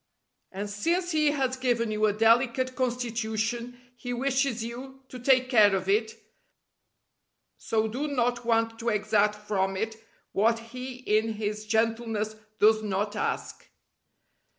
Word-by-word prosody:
And 200 +2 -4
since 340 - -1
He 305 -2 +3
has 265 -3 0
given 240 -3 0
you 215 0 +2
a 205 - +1
delicate 240 +4 +2
constitution 235 -1 -2 0.2
He 245 0 -5
wishes 265 -2 0
you 265 +3 -8
to 255 - -8
take 255 0 +3
care 215 -6 +5
of 190 0 -3
it, 220 +3 +1 1.4
so 220 0 0
do 260 +7 -3
not 245 -3 0
want 225 -1 +1
to 235 - -1
exact 210 -1 +2
from 195 -2 -1
it 220 +2 -3 0.3
what 225 +3 +2 0.2
He 255 0 -6
in 225 -3 0
His 210 0 -4
gentleness 225 -1 0 0.2
does 215 +1 +5
not 205 0 -2
ask. 210 - -3
225 Hz, 135 wpm, -27 LUFS, 215-250 Hz, 1.4 s, care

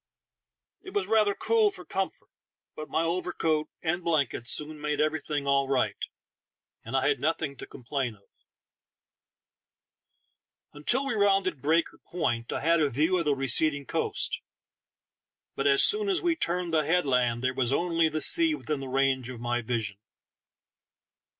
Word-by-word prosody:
It 380 +1 -11
was 410 - +1
rather 215 -2 +2
cool 225 -1 +2
for 180 -3 -10
comfort, 190 +3 -4 0.5
but 155 0 -8
my 165 - 0
overcoat 165 -3 -1
and 175 +2 -1
blankets 145 -8 0
soon 150 0 -1
made 150 0 -2
everything 155 -2 -1
all 140 -1 +2
right, 125 -7 0 0.8
and 120 +4 -2
I 130 - +1
had 145 - +1
nothing 150 0 -1
to - - -9
complain 125 -2 -4
of 100 - -26 2.5
Until 240 - 0
we 275 - -1
rounded 195 -7 +1
Breaker 160 +3 +1
Point 120 -9 -3
I - - -3
had 165 +2 +3
a 145 - +2
view 155 +8 +1
of 170 - -2
the 145 -1 +2
receding 140 +2 +1
coast, - - -2 1.1
but 135 - 0
as 140 0 +5
soon 420 -1 +4
as 375 - +3
we 345 -2 +1
turned 175 - -2
that 155 -2 +2
headland 125 -8 +1
there 130 0 +1
was 130 -2 0
only 165 +1 +2
the 155 0 -3
sea 330 -2 +5
within 150 - -4
the 135 - -6
range 135 -1 +1
of 125 -2 -8
my 120 +1 -1
vision. 110 -4 -3
150 Hz, 155 wpm, -27 LUFS, 135-180 Hz, 2.5 s, as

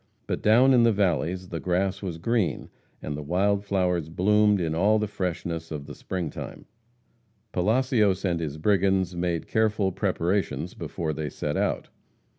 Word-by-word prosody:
But - - -3
down 125 +5 +5
in 125 - +6
the 115 0 +5
valleys 90 -2 0
the 85 - -4
grass 95 +2 0
was 90 -5 -4
green, 110 +1 -1 0.3
and 75 - -3
the 75 - -5
wild 100 +6 +1
flowers 90 -5 0
bloomed 105 +4 +3
in 80 -3 -1
all 105 +6 +3
the 105 - 0
freshness 85 -4 -4
of 75 -3 -5
the 75 - -8
spring 90 -3 -4
time. - - -8 0.9
Palacios 105 -1 +2
and 85 -3 0
his 75 -2 -4
brigands 95 0 +2
made 85 -1 -1
careful 110 -3 +1
preparations 95 0 -1
before 80 -2 -4
they 75 0 -3
set - - -3
out. - - -1
95 Hz, 160 wpm, -26 LUFS, 85-105 Hz, 0.9 s, in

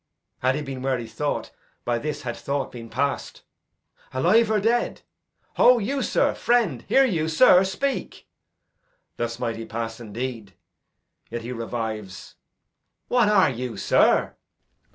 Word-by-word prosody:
Had 130 +1 +1
he 150 - -3
been 135 -2 -6
where 130 0 0
he 120 - -6
thought, 145 +6 -3 0.3
By 120 -1 0
this 145 +1 -4
had 120 -2 -4
thought 140 0 -3
been 115 -2 -9
past. 140 +5 -2 0.7
Alive 200 - +3
or 215 -1 +2
dead? 230 +4 0 0.5
Ho 250 0 +7
you, 260 +6 -1
sir! - - +1
friend! 230 - +1
Hear 270 0 +5
you, 165 -9 0
sir? 180 +2 +6
Speak! 270 +9 -3 0.9
Thus 115 -1 -3
might 115 -2 -3
he 115 - -6
pass 115 0 -5
indeed. 115 -2 -6 0.7
Yet 120 -1 -5
he 120 - -6
revives. 110 -5 -5 0.8
What 240 -4 +3
are 195 -8 +4
you, 125 -1 -5
sir? - - +3
130 Hz, 140 wpm, -24 LUFS, 115-195 Hz, 0.9 s, Ho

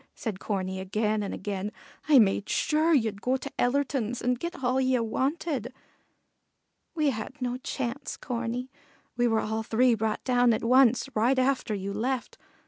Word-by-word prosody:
said 215 -6 -4
Corney 190 -2 -3
again 210 +3 0
and 200 - -3
again. 200 +1 -4 0.4
"I 295 - +8
made 205 -3 +3
sure 315 +2 +2
ye'd 220 -9 +1
go 255 +1 +1
to 280 +2 -7
Ellerton's 250 -2 0
and 250 0 0
get 340 -4 -5
all 255 +1 +2
ye 260 -1 +2
wanted." 260 +2 -1 1.2
"We 305 -3 +2
had 235 +5 -6
no 250 -1 -2
chance, 260 0 -4
Corney; 245 0 -4 0.4
we 240 0 +2
were 225 -1 +2
all 220 +1 -2
three 240 +3 +3
brought 220 -1 -1
down 245 -2 +3
at 220 - -2
once, 250 +1 +4
right 240 +5 +3
after 260 -4 +1
you 200 0 -4
left. 245 +4 -3
245 Hz, 160 wpm, -27 LUFS, 215-260 Hz, 1.2 s, I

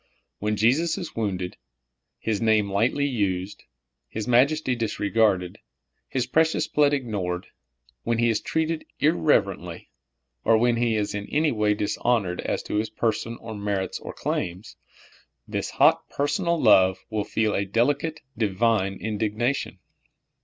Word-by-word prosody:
When 105 +1 0
Jesus 135 - +2
is 175 -5 -6
wounded, 95 -5 -3 0.6
His 110 -2 -2
name 110 -3 +2
lightly 120 +8 +1
used, 100 -7 -2 0.4
His 110 -1 -5
majesty 130 +2 +3
disregarded, 105 -4 0 0.5
His 130 -2 -1
precious 160 +4 +2
blood 145 -1 +3
ig 135 -3 -4
nored 90 -5 -3 0.3
— - - -37
when 115 - 0
He 120 0 +3
is 110 - -1
treated 160 0 -1 0.2
irreverently, 100 - +1 0.5
or 115 0 +5
when 120 +1 +2
He 115 -1 +1
is 105 -1 -1
in 100 0 -4
any 155 0 +1
way 105 -2 +1
dishonored 105 -3 0
as - - -2
to - - -3
His 110 +1 0
person 115 +1 -2
or 115 -1 -7
merits 100 -3 -2
or - - -7
claims 90 +5 -4 0.4
— - - -26 0.3
this - - -3
hot - - +3
personal 165 +4 0
love 95 - +5
will 105 -1 0
feel 110 0 0
a 100 - +1
delicate, 145 +10 0
divine 105 -2 +1
indignation. 110 +6 -2
110 Hz, 145 wpm, -25 LUFS, 100-125 Hz, 0.6 s, or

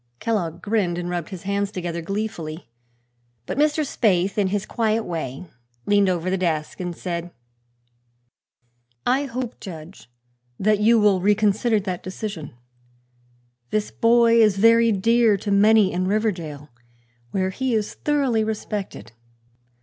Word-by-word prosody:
Kellogg 190 -8 -2
grinned 200 -5 0
and 175 0 -4
rubbed 175 -2 -3
his 185 -4 -8
hands 200 0 -1
together 175 -3 -4
gleefully. 175 -4 -5 0.8
But 255 - -4
Mr. 300 +1 +2
Spaythe, 195 -7 +1
in 205 -2 +1
his 200 +1 -2
quiet 225 -1 0
way, 160 -5 -5 0.4
leaned 205 -1 +3
over 180 0 -1
the 190 - 0
desk 160 -4 -2
and 175 -2 -4
said: 175 -1 -4 1.8
"I 265 +3 +2
hope, 250 -2 -5
Judge, 170 - -10 0.5
you 215 +3 +3
will 205 -3 +3
reconsider 210 +3 +2
that 185 -2 -4
decision. 185 - -6 1.1
This 215 -1 -1
boy 230 0 +4
is 210 -3 +4
very 230 +2 +5
dear 225 +1 +3
to 205 +1 -4
many 205 0 +5
in 185 +1 -1
Riverdale, 175 -9 -2 0.6
where 190 +6 -1
he 260 +3 -1
is 210 -1 -1
thoroughly 275 -7 0
respected. 210 - -5
200 Hz, 130 wpm, -23 LUFS, 180-220 Hz, 1.8 s, very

